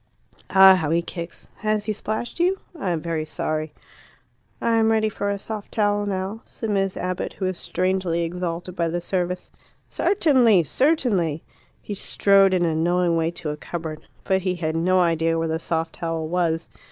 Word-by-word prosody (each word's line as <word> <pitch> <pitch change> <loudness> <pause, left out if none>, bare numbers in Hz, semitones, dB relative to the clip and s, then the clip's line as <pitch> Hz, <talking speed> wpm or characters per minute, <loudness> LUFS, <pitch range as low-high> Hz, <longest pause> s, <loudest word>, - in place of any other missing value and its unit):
Ah, 190 0 +8
how 160 -4 -1
he 170 +2 +2
kicks! 170 -1 -7
Has 215 -1 -1
he 215 - -1
splashed 220 - -4
you? 365 +3 +2 0.2
I 235 - -3
am 165 -3 -1
very 165 -1 -2
sorry." 155 0 -3 0.9
"I 230 -1 +2
am 225 0 +3
ready 220 -1 +2
for 200 -1 -3
a 200 - -1
soft 210 +1 -6
towel 205 -1 +1
now," 195 +3 -3
said 225 -2 -5
Miss 195 -2 0
Abbott, 180 0 -3
who 190 - -4
was 185 -1 -2
strangely 185 -2 0
exalted 175 +1 -4
by 170 -2 0
the 170 +2 -1
service. 180 0 -3 0.4
"Certainly! 250 - +4
certainly!" 195 - +1 0.4
He 210 - -5
strode 195 0 +4
in 175 -1 +2
a 165 - +1
knowing 175 +2 +2
way 165 0 +1
to 165 -2 -4
a 150 - -5
cupboard. 160 -1 -6 0.2
But 190 0 +1
he 185 0 -1
had 160 -2 -2
no 185 +3 +3
idea 165 -1 +2
where 165 0 0
the 160 0 -1
soft 165 -1 -2
towel 165 -2 -3
was. 165 -1 0
180 Hz, 180 wpm, -23 LUFS, 165-205 Hz, 0.9 s, Ah